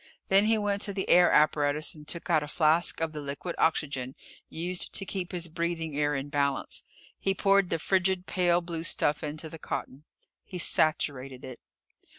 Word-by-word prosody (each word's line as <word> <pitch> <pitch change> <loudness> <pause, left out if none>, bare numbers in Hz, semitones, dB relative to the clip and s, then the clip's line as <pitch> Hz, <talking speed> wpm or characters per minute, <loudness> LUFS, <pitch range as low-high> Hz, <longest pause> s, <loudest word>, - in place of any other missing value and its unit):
Then 195 +2 +5
he 220 +1 +3
went 205 -1 -1
to 200 - -1
the 190 -1 -3
air 180 0 +6
apparatus 150 0 +2
and 150 -1 -14
took 170 - -5
out 160 -3 +3
a 150 - -5
flask 160 +2 +2
of 160 -1 -1
the 150 - -5
liquid 140 +5 -5
oxygen 140 -5 0 0.3
used 175 +2 -3
to 195 - -2
keep 185 -2 -4
his 175 -2 -1
breathing 165 -2 -3
air 145 0 +1
in 135 +1 -4
balance. 140 -1 -1 0.4
He 195 0 0
poured 195 -2 +3
the 165 - 0
frigid, 185 +2 0
pale 175 -2 +2
blue 170 -1 -4
stuff 150 -2 +3
into 155 +1 -5
the 160 +1 -10
cotton. 140 0 -6 0.4
He 185 - -8
saturated 135 -6 +1
it. 130 -2 -9
165 Hz, 180 wpm, -28 LUFS, 150-180 Hz, 0.4 s, air